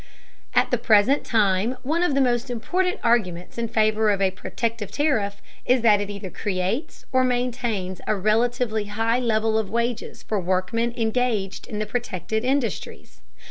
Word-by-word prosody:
At - - +3
the - - +2
present 225 +6 +4
time 215 +2 +1
one 315 +6 0
of 355 -6 +2
the 275 - +3
most 245 0 +1
important 360 +11 -1
arguments 205 -5 0
in 230 - -1
favor 220 -1 +2
of 200 -1 +2
a 190 -1 +2
protective 225 +3 -3
tariff 220 -10 0 0.2
is 250 -1 +3
that 210 -3 +5
it 205 - -4
either 200 -2 -6
creates 205 - -3
or 260 0 +3
maintains 245 -7 -1
a 215 - +2
relatively 220 +2 +1
high 225 +3 0
level 220 -2 +1
of 210 -3 -3
wages 235 +2 -2
for 215 - -1
workmen 185 +6 0
engaged 225 -4 -1
in 210 - -5
the 215 - -1
protected 220 -3 -3
industries. 245 - -2
220 Hz, 160 wpm, -24 LUFS, 205-245 Hz, 0.2 s, that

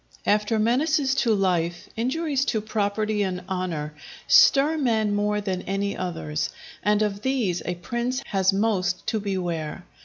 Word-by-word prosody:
After 210 +2 +2
menaces 265 +5 +2
to 235 -5 +2
life, 175 -3 0
injuries 275 +4 0
to 220 - 0
property 215 0 -1
and 185 -2 -2
honour 175 -5 -3 0.3
stir 290 +3 +6
men 220 -6 +1
more 210 0 0
than 190 -3 -2
any 200 +1 -2
others, 160 -4 -3 0.3
and 210 0 +2
of 205 -1 -2
these 235 -10 0
a 180 - -1
Prince 240 +8 -3
has 190 -1 +3
most 195 -3 0
to 220 0 0
beware. 180 -4 -3
205 Hz, 145 wpm, -25 LUFS, 185-230 Hz, 0.3 s, stir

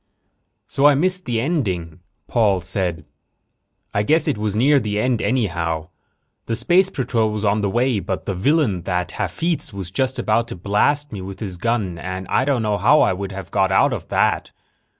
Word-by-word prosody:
"So 140 +1 +3
I 145 - +5
missed 180 +5 +1
the 120 -3 -1
ending," 95 - -2 0.3
Paul 105 -6 +2
said. 90 -3 -3 0.9
"I 100 - +1
guess 155 +10 +2
it - - +1
was 105 -1 -2
near 140 +6 +4
the 105 -3 -3
end, 125 0 +1
anyhow. 85 -10 -1 0.6
The 115 - -1
space 175 - +3
patrol 125 - 0
was 105 0 -3
on 105 +1 +2
the 100 - 0
way, 120 +1 +1
but 95 0 -4
the 100 - -2
villain, 110 - +1
that 90 -1 -1
Hafitz, 170 0 -2
was 95 -3 -7
just 130 +5 -1
about 115 +2 +1
to - - -7
blast 125 +11 +1
me 100 -4 -6
with 95 +1 -8
his 100 -5 -4
gun 100 -3 -2
and 95 +1 -5
I 130 - +2
don't 135 -5 +1
know 105 -1 0
how 135 +10 +5
I - - +3
would 100 +1 -5
have 95 -3 -8
got 95 0 +2
out 95 - +3
of - - -6
that." - - 0
105 Hz, 190 wpm, -21 LUFS, 95-130 Hz, 0.9 s, I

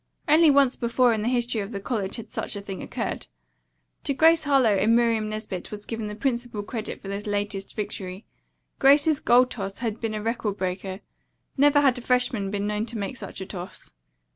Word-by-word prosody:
Only 315 +1 +6
once 275 -2 +4
before 240 0 +2
in 220 - -1
the 220 - -1
history 240 -2 0
of 200 +2 -6
the 200 - -4
college 200 -2 -2
had 230 - -8
such - - -3
a 200 - -5
thing 195 -2 -7
occurred. - - -4 0.8
To 280 - 0
Grace 325 +2 +5
Harlowe 265 -7 +4
and 225 +4 +4
Miriam 230 -2 +2
Nesbit 215 -4 -5
was 210 -1 -7
given 225 -2 -4
the 210 - -6
principal 235 -3 -2
credit 220 0 -5
for - - -8
this 200 +2 -4
latest 205 -1 -3
victory. 195 -2 -5 0.5
Grace's 285 +2 +5
goal 245 +1 +5
toss 195 -6 -6
had 225 -2 -3
been 225 -2 -2
a 210 - -4
record 225 -3 -2
breaker. 185 +1 -4 0.5
Never 290 +1 +5
had 265 -3 +3
a - - -9
freshman 245 -5 +1
been 200 0 -2
known 210 +2 -1
to 235 0 -4
make 200 +4 -4
such 240 - -8
a - - -4
toss. 185 -1 -9
220 Hz, 200 wpm, -25 LUFS, 205-250 Hz, 0.8 s, Only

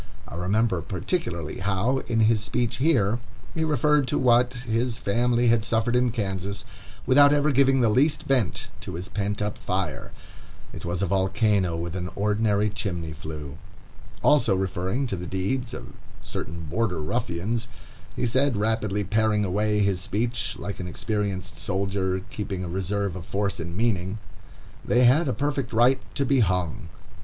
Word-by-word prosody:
I - - -10
remember, 95 +1 +1
particularly, 90 - -3
how, 100 +8 +1
in 115 -1 +1
his 110 -1 +4
speech 115 +3 -1
here, 120 -7 +2 0.3
he 160 - -1
referred 150 -2 +2
to - - 0
what 125 -1 +4
his 120 0 -1
family 120 +3 +2
had 115 -1 +3
suffered 115 +1 +1
in 125 0 +3
Kansas, 100 -3 -3 0.4
without 145 +2 +6
ever 145 +1 +3
giving 135 0 +4
the 115 - +4
least 140 +8 +2
vent 130 -8 0
to - - -6
his 90 +2 -4
pent 105 +1 -2
up 105 0 -3
fire. 95 -2 -3 0.6
It - - -7
was 85 +2 -1
a - - +3
volcano 95 -1 +1
with 85 +1 -4
an 90 -1 -3
ordinary 105 0 +1
chimney 90 -6 -3
flue. 75 -2 -8 0.6
Also 145 -9 +4
referring 95 +7 -1
to 115 - -2
the 90 -1 -6
deeds 115 +7 -2
of - - -8 0.3
certain 85 0 -5
Border 90 +3 -1
Ruffians, 110 +6 -2 0.5
he - - -1
said, 130 0 +2
rapidly 105 -1 0
paring 105 +1 +1
away 105 +2 +1
his 100 -3 +1
speech, 115 +6 -1
like 100 - -6
an 90 - -4
experienced 95 -3 -3
soldier, 95 0 -1
keeping 100 -6 -4
a - - -4
reserve 95 +2 -2
of 90 - -6
force 100 +2 -2
and 85 +1 -5
meaning, 100 -3 0 0.7
"They 125 +1 +3
had 140 +7 +5
a - - +1
perfect 140 -3 -2
right 120 +4 +4
to 140 - +1
be 135 0 +3
hung." 90 -3 0
105 Hz, 160 wpm, -25 LUFS, 95-120 Hz, 0.7 s, without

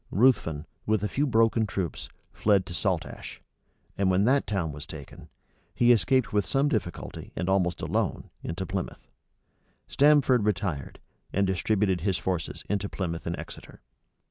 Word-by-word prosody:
Ruthven, 90 - +2 0.2
with 110 -2 +2
a - - +2
few 145 +7 0
broken 115 -2 +3
troops, 95 -5 -4 0.2
fled 100 -3 +3
to - - -8
Saltash; - - -3 0.6
and 100 -1 +2
when 95 +2 +3
that 135 +5 +3
town 90 -7 -1
was 75 +1 -8
taken, 75 -4 -10 0.5
he 120 0 +5
escaped 120 +3 +3
with 105 -1 +3
some 135 +6 +1
difficulty, 95 - -4
and 90 - -2
almost 90 -3 +1
alone, - - -1
into 95 +3 -4
Plymouth. 95 -1 -5 0.8
Stamford 140 -4 +4
retired, 90 -9 -2 0.3
and 100 +1 +2
distributed 95 0 +1
his 95 0 +1
forces 90 -3 -3
into 100 0 -1
Plymouth 85 -4 -4
and 85 - -2
Exeter. - - -10
100 Hz, 145 wpm, -27 LUFS, 90-110 Hz, 0.8 s, he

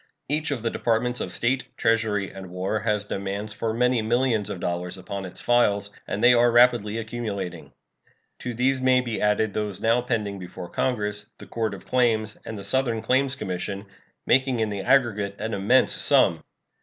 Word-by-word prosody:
Each 150 +2 -1
of 135 -6 -3
the 115 - 0
Departments 120 +1 0
of - - -4
State, 125 +2 0
Treasury, 110 -3 +1
and 95 -1 -9
War 95 +4 -2
has 105 -1 -1
demands 100 +1 -4
for 110 +1 -2
many 125 +1 +2
millions 115 -1 +1
of 90 - -5
dollars 90 +1 -3
upon 95 +1 -6
its 90 - -8
files, 105 -4 +2 0.2
and 105 - -3
they 125 +1 +8
are 120 0 +5
rapidly 120 -3 +4
accumulating. 105 -6 -5 0.7
To 125 -1 -5
these 130 +2 +1
may 130 0 +4
be 120 -3 -4
added 105 0 +1
those 105 -2 -3
now 115 +3 +2
pending 105 -5 -2
before 90 -1 -8
Congress, 105 -4 -2
the - - -11
Court 110 -3 -2
of - - -13
Claims, 110 -4 +1
and 110 - -6
the 100 - -7
Southern 120 -3 0
Claims 130 +3 +2
Commission, 100 -2 -4 0.4
making 130 -2 +2
in 110 -1 0
the 100 -1 -3
aggregate 105 -4 +2
an 110 - -3
immense 100 +7 +3
sum. - - +3
110 Hz, 180 wpm, -25 LUFS, 100-120 Hz, 0.7 s, they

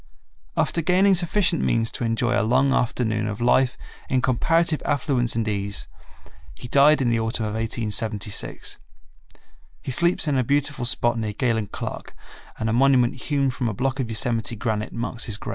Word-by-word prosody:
After 170 - +1
gaining 185 +4 +4
sufficient 175 0 +2
means 115 -1 +1
to - - -4
enjoy 115 +1 0
a 100 - +2
long 130 +5 +2
afternoon 110 -3 0
of 105 -1 -4
life 125 +2 +2 0.3
in 130 - +2
comparative 160 +5 +2
affluence 130 -5 0
and 115 -1 -1
ease, 100 -1 -3 0.7
he 120 - -9
died 140 +3 +5
in 120 - +1
the 115 - +1
autumn 110 0 -1
of 105 - -3
1876. 110 -2 -2 1.0
He - - -4
sleeps 170 +4 +1
in 140 -3 +2
a - - +2
beautiful 140 0 0
spot 120 -1 +1
near 110 -2 -3
Galen 115 -2 0
Clark - - -7 0.4
and 110 - -2
a 110 - 0
monument 125 -1 +4
hewn 140 0 -1
from 125 -2 -2
a 105 - -5
block 135 +4 -1
of 125 -4 -2
Yosemite 115 +1 -1
granite 110 0 -2
marks 115 0 -4
his 105 -2 -4
grave. - - -7
120 Hz, 175 wpm, -23 LUFS, 110-135 Hz, 1.0 s, died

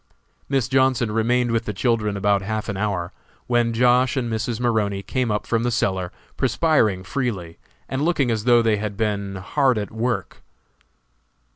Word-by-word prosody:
Miss 135 -4 +1
Johnson 130 -4 +2
remained 120 +2 +1
with 115 0 0
the 105 - -4
children 105 -1 0
about 100 0 +2
half 110 +2 -3
an 105 - -2
hour, 95 -4 -2 0.3
when 120 -1 +1
Josh. 125 +3 +3
and 120 -3 -1
Mrs. 115 +1 -2
Maroney 105 -5 0
came 125 +4 -1
up 105 0 -1
from 115 -1 0
the 120 - 0
cellar, 95 -6 -1 0.3
perspiring 110 - +2
freely, 95 -8 -3 0.3
and 135 - -3
looking 150 -6 +1
as 110 -1 -2
though 120 -1 +5
they 110 -2 +2
had 105 -1 -4
been 100 -3 -2
hard 125 +7 +1
at 105 -1 -3
work. 115 -3 -3
115 Hz, 165 wpm, -22 LUFS, 100-125 Hz, 0.3 s, though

